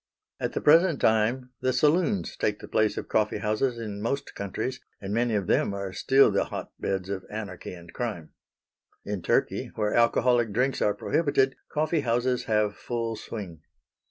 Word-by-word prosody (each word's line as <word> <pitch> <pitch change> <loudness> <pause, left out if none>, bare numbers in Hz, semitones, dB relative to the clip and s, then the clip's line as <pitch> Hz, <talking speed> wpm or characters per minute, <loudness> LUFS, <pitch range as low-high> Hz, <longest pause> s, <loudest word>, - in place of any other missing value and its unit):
At - - -2
the - - -2
present 165 0 +5
time 115 +4 +2
the 130 - +2
saloons 175 - +2
take 105 -1 0
the - - -10
place 110 -1 +1
of - - -4
coffee 105 -1 +1
houses 110 +4 0
in 105 -3 -5
most 135 +6 -2
countries, 110 +6 -4 0.2
and 100 0 -5
many 115 0 +1
of 100 -3 0
them 100 - +1
are 100 -1 -4
still 135 +6 +4
the - - +1
hotbeds 95 -2 -4
of 95 -1 -4
anarchy 105 -4 -6
and 85 -1 -13
crime. 105 -10 -4 0.7
In 100 -3 -3
Turkey, 85 - 0
where 105 -1 0
alcoholic 120 -1 +3
drinks 130 +4 +1
are 105 - +2
prohibited, 135 -4 +1 0.2
coffee 155 +2 +1
houses 125 -1 0
have 105 -1 +1
full 115 -2 -3
swing. 100 -7 -7
110 Hz, 165 wpm, -27 LUFS, 105-130 Hz, 0.7 s, present